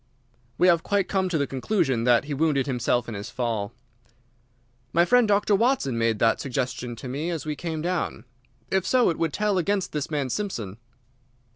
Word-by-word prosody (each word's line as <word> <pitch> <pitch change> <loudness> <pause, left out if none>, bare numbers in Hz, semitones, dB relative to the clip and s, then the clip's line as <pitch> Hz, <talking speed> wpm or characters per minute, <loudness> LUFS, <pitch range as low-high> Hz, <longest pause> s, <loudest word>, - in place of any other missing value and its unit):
"We 180 - +4
have 170 -2 +5
quite 200 +1 0
come 190 -2 0
to 170 - 0
the 140 - +1
conclusion 135 - 0
that 120 -2 +4
he 145 - -4
wounded 145 -2 +1
himself 125 -2 0
in 115 - -5
his 100 +3 -6
fall." 115 -5 -2 1.2
"My 170 +1 +4
friend 245 +2 +4
Dr. 205 0 +2
Watson 225 - +2
made 115 -1 +1
that 115 +1 +2
suggestion 125 -2 -3
to 115 - -8
me 145 +7 -3
as 165 -4 -3
we 150 -1 -2
came 160 0 -4
down. 175 -6 -2 0.5
If 190 -1 +2
so, 250 -7 +4
it 165 - -6
would 165 -2 0
tell 205 0 +1
against 195 +1 0
this 150 -1 -3
man 145 -5 -2
Simpson." 115 - -4
150 Hz, 185 wpm, -25 LUFS, 125-185 Hz, 1.2 s, have